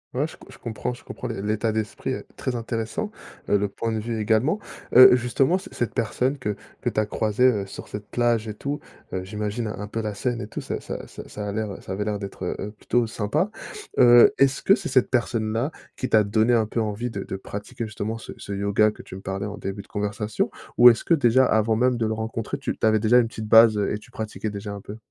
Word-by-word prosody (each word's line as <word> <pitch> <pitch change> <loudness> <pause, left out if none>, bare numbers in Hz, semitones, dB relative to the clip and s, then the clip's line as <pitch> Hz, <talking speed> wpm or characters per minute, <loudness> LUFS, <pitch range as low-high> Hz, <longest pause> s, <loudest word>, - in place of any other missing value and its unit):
Ouais, 135 +4 +1
je 160 - -8
co - - -16
je - - -13
comprends, 115 0 -4
je 120 - -17
comprends - - -7
l'é - - -4
l'état 105 +2 0
d'esprit 110 -1 -3
est - - -6
très 125 - -3
intéressant, 115 - -3 0.4
heu, 105 - +3
le 100 0 0
point 115 +3 -3
de 110 - -1
vue, 115 +1 -3
également, 110 - +2 0.4
heu, 125 0 +10
justement, 130 +8 +2
c 190 - -11
cette 115 -4 -2
personne 125 +5 0
que 105 -5 -2 0.3
que - - 0
tu - - -1
as 110 - +2
croisée, 110 +2 0
heu, 105 -6 +3
sur - - -9
cette 105 0 -7
plage 120 -2 +1
et 105 - -5
tout, 145 +6 -3 0.3
heu, 95 - -2
j'imagine 105 +3 -3
un 105 -1 -5
peu 115 +2 -3
la 105 -2 -3
scène 120 +3 -2
et 105 - -5
tout, - - -6
ça - - -4
ça - - -6
ça - - -10
ça 105 0 -5
a - - -2
l'air, 110 +1 -2
heu, - - -8
ça - - -8
avait 100 +2 -2
l'air 105 -1 -1
d'être, 100 -2 -7
heu 90 - -2
heu, 105 - -4
plutôt 120 +3 0
sympa, 115 - -1 0.5
heu, 120 -1 +8
est-ce 135 0 +3
que 195 - +6
c'est 195 -5 -1
cette 130 - +3
personne-là 115 +1 0 0.2
qui 130 - -3
t'a 110 -1 +5
donné 110 +3 +2
un 110 -2 +3
peu 115 +2 -2
envie 110 +3 -2
de 100 -3 -4
de - - -5
pratiquer, 100 +4 -6
justement, 110 0 -4
ce 115 - -9
ce - - -8
yoga 100 +2 +3
que 105 - -10
tu - - -10
me 95 - -8
parlais 95 +1 -3
en 105 0 -6
début 95 +1 -5
de - - -23
conversation 105 +1 -2 0.3
ou 120 0 +11
est-ce 115 - +2
que, - - +2
déjà, 130 -4 +4
avant 110 -1 +2
même 125 +2 +2
de 115 -1 0
le 110 - 0
rencontrer, 110 0 -3
tu - - -3
tu - - +1
avais 110 0 +4
déjà 115 +3 +5
une 120 - +2
petite 110 -1 -7
base, 110 0 +7
heu 100 - 0
et 105 - -3
tu 110 - -18
pratiquais 110 -2 -4
déjà 100 0 -6
un 100 - -7
peu? 105 +2 -9
110 Hz, 260 wpm, -24 LUFS, 105-120 Hz, 0.5 s, ou